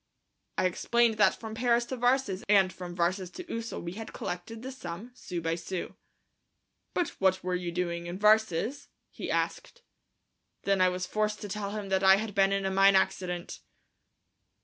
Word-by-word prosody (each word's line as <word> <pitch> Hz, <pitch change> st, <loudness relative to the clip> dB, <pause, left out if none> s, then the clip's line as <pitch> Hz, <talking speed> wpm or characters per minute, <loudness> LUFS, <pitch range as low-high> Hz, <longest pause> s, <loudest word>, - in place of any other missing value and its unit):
I -, -, +2 dB
explained 230 Hz, +5 st, +2 dB
that 205 Hz, -2 st, +4 dB
from 220 Hz, -1 st, -7 dB
Paris 235 Hz, +1 st, +2 dB
to 260 Hz, -, -4 dB
Varses 245 Hz, -5 st, +1 dB
and 195 Hz, -3 st, +5 dB
from 175 Hz, 0 st, -7 dB
Varses 180 Hz, +1 st, 0 dB
to 365 Hz, -, -7 dB
Ussel 230 Hz, -, -5 dB
we 170 Hz, -, -4 dB
had 220 Hz, +4 st, -8 dB
collected 220 Hz, +6 st, -5 dB
this 260 Hz, 0 st, -7 dB
sum, 175 Hz, +8 st, -7 dB
sou 180 Hz, -8 st, -5 dB
by 165 Hz, 0 st, 0 dB
sou. 175 Hz, +2 st, -4 dB, 1.0 s
"But 355 Hz, -, +1 dB
what 190 Hz, 0 st, +3 dB
were 180 Hz, 0 st, -1 dB
you 180 Hz, -1 st, -2 dB
doing 170 Hz, -1 st, -2 dB
in 175 Hz, +1 st, -5 dB
Varses?" 215 Hz, -, +2 dB, 0.2 s
he -, -, -6 dB
asked. 485 Hz, -, -2 dB, 0.8 s
Then 195 Hz, -1 st, +2 dB
I 185 Hz, -, +6 dB
was 180 Hz, 0 st, -3 dB
forced 210 Hz, +2 st, -1 dB
to 205 Hz, -, -5 dB
tell 200 Hz, 0 st, -3 dB
him 205 Hz, -1 st, -5 dB
that 190 Hz, 0 st, +1 dB
I 190 Hz, 0 st, +8 dB
had 210 Hz, +1 st, -3 dB
been 195 Hz, 0 st, +4 dB
in 195 Hz, 0 st, 0 dB
a 190 Hz, -, 0 dB
mine 195 Hz, +1 st, +6 dB
accident. 180 Hz, -2 st, 0 dB
195 Hz, 180 wpm, -29 LUFS, 180-220 Hz, 1.0 s, I